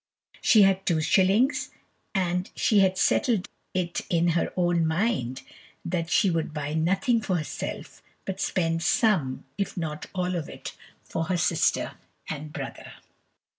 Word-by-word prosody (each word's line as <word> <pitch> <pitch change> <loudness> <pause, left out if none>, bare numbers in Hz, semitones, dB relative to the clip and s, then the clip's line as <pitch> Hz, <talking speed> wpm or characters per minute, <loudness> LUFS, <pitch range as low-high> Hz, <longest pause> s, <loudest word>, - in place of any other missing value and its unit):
She 215 -3 +6
had 195 0 +3
two 165 -3 +3
shillings, 195 - +3 0.5
and 180 -1 0
she 210 - +3
had 190 -1 +3
settled 215 -3 +2 0.3
it 175 -2 -1
in 170 0 +2
her 170 0 +1
own 175 -2 +2
mind 160 - -1 0.4
that 170 -1 -2
she 195 -1 +3
would 160 -1 -2
buy 150 0 -3
nothing 195 - +2
for 195 -4 -1
herself, 155 -3 -5 0.2
but 190 0 -4
spend 165 -2 0
some, 170 - +1
if 200 - -2
not 155 -3 -4
all 180 0 -1
of 165 -3 -3
it, - - -8 0.3
for 165 - -3
her 180 +1 0
sister 160 - +1 0.3
and 155 0 -5
brother. - - -7
175 Hz, 145 wpm, -26 LUFS, 160-195 Hz, 0.5 s, She